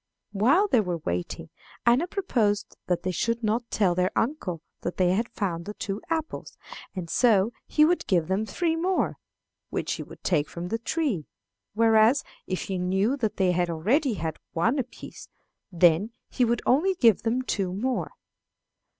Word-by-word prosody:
While 260 - +3
they 250 - +4
were 180 -4 -2
waiting 90 - -4 0.3
Anna 245 +9 +4
proposed 230 - 0
that 180 -1 0
they 185 - -1
should 230 +6 -1
not 230 +2 0
tell 190 -5 +2
their 180 +1 +1
uncle 200 - -1 0.2
that 175 - -4
they 180 -1 +3
had 225 +5 0
found 170 -5 -3
the 210 - -6
two 200 +1 -4
apples, 320 -1 -3 0.4
and 180 -3 -4
so 220 +3 +3
he 305 - +4
would 350 +3 +1
give 175 -5 +2
them 195 +4 0
three 325 - 0
more, 360 +3 0 0.5
which - - -2
he - - -5
would - - -12
take 155 -5 +1
from 175 +1 -6
the 225 - -1
tree; 235 - -1 0.5
whereas, 225 +3 +4 0.2
if 185 - -2
he 190 -2 -3
knew 190 +7 +1
that 220 -6 -2
they 185 -2 +3
had 175 0 0
already 225 - +1
had 160 -3 -4
one 205 - +1
apiece, 250 -1 -8 0.4
then 175 +3 +4 0.2
he 250 - +1
would 235 0 0
only 350 +9 +3
give 230 - +4
them 240 +3 0
two 195 -7 -1
more. 240 +7 -1
215 Hz, 170 wpm, -26 LUFS, 180-250 Hz, 0.5 s, they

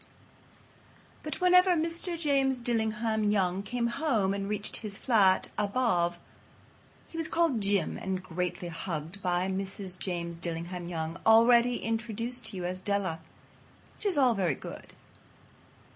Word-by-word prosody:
But 305 - -5
whenever 360 0 +5
Mr. 335 +1 -2
James 275 -4 +2
Dillingham 220 -2 0
Young 195 -3 +1
came 235 +4 -2
home 235 -6 +1
and 200 0 -3
reached 210 0 -2
his 205 -3 -6
flat 200 -7 +3
above 200 -5 +1 0.9
he 330 - -6
was 325 - -1
called 330 -9 +1
"Jim" 200 -1 0
and 190 -1 -3
greatly 180 0 -3
hugged 165 +2 -5
by 180 0 0
Mrs. 190 -1 -3
James 170 -2 -3
Dillingham 170 +1 -4
Young, 165 0 -4
already 235 +2 +5
introduced 230 +1 -2
to 205 - -6
you 180 - -4
as 185 +1 -3
Della. 190 -4 -1 0.8
Which 425 - -3
is 370 -6 +1
all 255 -4 +5
very 180 -9 0
good. - - -10
205 Hz, 135 wpm, -29 LUFS, 180-245 Hz, 0.9 s, whenever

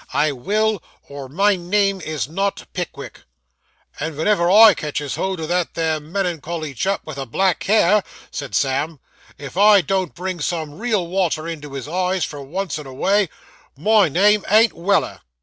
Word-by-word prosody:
I 150 0 +2
will, 210 - 0 0.3
or 140 -2 -8
my 200 +7 +2
name 195 +2 0
is 155 -5 -3
not 195 +5 -2
Pickwick.' 180 -2 -6 0.8
'And 155 +1 -3
venever 170 +2 +2
I 215 +2 +9
catches 150 -2 -4
hold 190 -2 -2
o' 160 - -3
that 175 +1 -1
there 160 -1 0
melan 170 +1 -3
cholly 155 -2 -5
chap 195 +11 -1
with 155 -3 -8
the 135 -2 -5
black 190 +9 +1
hair,' 210 0 +4 0.3
said 140 - -5
Sam, 140 +3 0 0.4
'if 140 +3 -9
I 205 0 +7
don't 185 0 -2
bring 185 0 -4
some 155 0 -3
real 220 -6 0
water 170 -3 -1
into 150 -4 -7
his 135 -1 -6
eyes, 180 +2 0
for 145 -2 -8
once 160 +3 -4
in 150 - -9
a 130 - -9
way, 200 +5 +2 0.5
my 210 +3 +4
name 205 +6 +3
ain't 220 +3 +5
Weller. 195 +4 0
175 Hz, 170 wpm, -20 LUFS, 150-195 Hz, 0.8 s, I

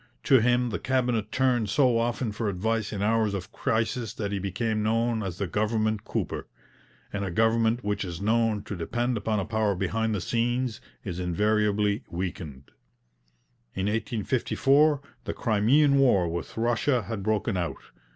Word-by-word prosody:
To 130 - +5
him 120 +1 +2
the - - -2
Cabinet 125 -5 0
turned 125 -3 +1
so 125 +2 +3
often 120 0 -1
for 105 +1 -2
advice 105 +3 -1
in 100 -1 -3
hours 110 -1 +2
of 95 -1 -6
crisis 115 -1 -1
that 100 -2 -3
he 100 - -1
became 105 +3 -1
known 115 +1 +1
as 95 -4 -4
the 100 - -1
'government 110 +2 0
cooper'; - - -3 0.7
and 100 - -2
a 95 - -2
government 115 +4 +2
which 105 0 -1
is 85 -3 -6
known 110 0 +1
to 105 -1 -6
depend 120 +8 -1
upon 105 0 -1
a 95 - -2
power 110 -1 0
behind 110 +4 -1
the - - -1
scenes 120 0 -1 0.2
is 90 -3 -5
invariably 105 +3 +1
weakened. 85 -6 -6 1.0
In 95 - -1
1854 125 +7 +2 0.2
the - - -2
Crimean 135 +6 +3
War 100 -10 +4
with 85 +4 -5
Russia 120 +2 +1
had 100 +1 -5
broken 105 -1 0
out. 85 -2 -2
110 Hz, 160 wpm, -27 LUFS, 100-120 Hz, 1.0 s, To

